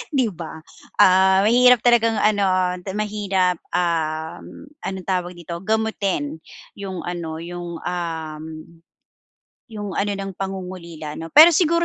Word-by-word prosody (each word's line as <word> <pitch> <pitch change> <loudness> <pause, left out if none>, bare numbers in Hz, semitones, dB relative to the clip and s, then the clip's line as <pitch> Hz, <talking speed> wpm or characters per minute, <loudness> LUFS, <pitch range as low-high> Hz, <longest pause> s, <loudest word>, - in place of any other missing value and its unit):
'di 245 -6 +2
ba? 160 -2 -9 0.3
Ah, 190 +1 +5
mahirap 245 +1 +5
talagang, 230 -2 +4
ano, 190 -4 +2
te 190 - -5
mahirap, 200 -4 0 0.2
um, 160 - -3 0.2
anong 190 -2 -6
tawag 180 -2 -2
dito, 170 0 -7
gamutin 195 -7 -1 0.4
'yong, 190 -3 -5
ano, 170 -2 -5
'yong, 175 0 -6
um, 160 -3 -4 1.2
'yong, 205 -3 -6
ano 205 0 0
ng 195 0 -5
pangungulila, 180 -5 -6
'no. 165 - -6
Pero 315 +4 +9
siguro 335 +1 +3
185 Hz, 120 wpm, -22 LUFS, 170-210 Hz, 1.2 s, Pero